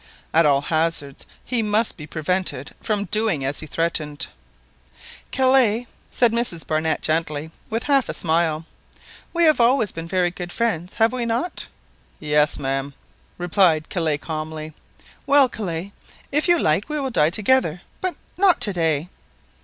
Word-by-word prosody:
At 165 -1 +5
all 140 -1 +3
hazards 155 -3 -1 0.2
he 245 -3 0
must 215 +1 +1
be 150 -3 -10
prevented 160 -3 -2
from 205 -2 0
doing 210 -11 0
as 135 +1 -2
he 155 - -7
threatened. 155 -2 -1 1.0
"Kellet," 255 -3 +3 0.2
said 240 -2 +3
Mrs 230 -8 0
Barnett 160 0 -1
gently, 155 -1 -1 0.2
with 225 +2 -2
a - - -10
half 275 -4 +3
smile, 160 -1 +1 0.7
"we 340 0 +1
have 310 -4 +5
always 235 -3 +3
been 165 0 -7
very 180 0 +1
good 175 0 -7
friends, 185 -6 -1
have 225 +2 +3
we 245 -2 -1
not?" 235 +10 -2 0.5
"Yes, 150 -1 +2
ma'am," 135 0 -3 0.4
replied 175 -3 +2
Kellet 155 -5 -1
calmly. 155 0 -5 0.5
"Well, 280 -2 +7
Kellet, 190 -5 -5 0.4
if 295 +4 +2
you 345 0 +5
like 185 - +1
we 300 0 -1
will 270 -2 -2
die 150 -8 +3
together, 195 -3 +1 0.2
but 370 -3 -1 0.2
not 375 -1 +4
to 205 - +4
day." 160 -2 0
175 Hz, 150 wpm, -22 LUFS, 155-235 Hz, 1.0 s, Well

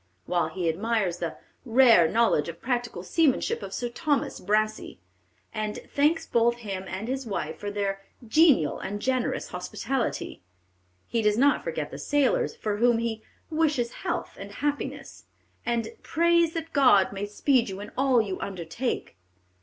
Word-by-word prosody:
While 175 -2 +1
he 175 +1 -3
admires 195 +1 0
the 165 -2 -4 0.3
"rare 235 -8 +6
knowledge 220 -7 +2
of 170 0 -8
practical 240 -7 -2
seamanship 295 - +1
of 195 -1 -7
Sir 240 +5 -2
Thomas 285 +2 -1
Brassey," 215 +2 -1 0.6
and 215 -1 -3 0.2
thanks 320 +3 +2
both 235 0 +2
him 190 -2 -4
and 195 +4 -5
his 265 0 -3
wife 205 - -4
for 205 - -4
their 200 -1 -2 0.3
"genial 260 - +4
and 205 +2 -4
generous 255 +2 -1
hospitality," 265 -3 -3 0.7
he 230 - 0
does 210 -1 +2
not 280 +3 +3
forget - - -4
the - - -7
sailors, 290 -3 +1
for 210 -1 -2
whom 240 +1 +4
he 225 -1 -2 0.3
"wishes 295 -7 +1
health - - -4
and - - -8
happiness," 290 0 -4 0.4
and 235 -1 0
"prays 340 0 +2
that 325 -1 -5
God 205 -10 +5
may 200 +1 -4
speed 240 +2 +2
you 190 0 -6
in 205 - -8
all 265 -2 +3
you 195 -3 -4
undertake." 190 - -4
230 Hz, 155 wpm, -26 LUFS, 200-270 Hz, 0.7 s, rare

